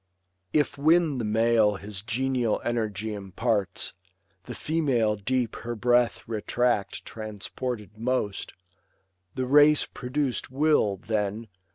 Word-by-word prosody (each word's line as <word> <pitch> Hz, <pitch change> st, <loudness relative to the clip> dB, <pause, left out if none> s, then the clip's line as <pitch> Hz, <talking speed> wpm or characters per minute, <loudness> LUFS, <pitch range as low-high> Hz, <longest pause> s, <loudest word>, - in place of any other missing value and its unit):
If 145 Hz, -2 st, +1 dB
when 155 Hz, -2 st, +3 dB
the -, -, -2 dB
male 110 Hz, -1 st, +3 dB
his 100 Hz, 0 st, -6 dB
genial 120 Hz, +1 st, 0 dB
energy 110 Hz, -3 st, -1 dB
Imparts, 100 Hz, 0 st, -2 dB, 0.5 s
the -, -, -7 dB
female 135 Hz, -9 st, +1 dB
deep 120 Hz, +3 st, -1 dB
her 120 Hz, 0 st, -5 dB
breath 120 Hz, +1 st, +2 dB
retract 115 Hz, 0 st, -1 dB
Transported 110 Hz, +1 st, -5 dB
most, 115 Hz, -4 st, -2 dB, 0.8 s
the 130 Hz, 0 st, -1 dB
race 145 Hz, +3 st, +6 dB
produc'd 130 Hz, 0 st, -2 dB
will, 135 Hz, -7 st, +2 dB
then. 105 Hz, +2 st, -2 dB
115 Hz, 105 wpm, -27 LUFS, 105-130 Hz, 0.8 s, race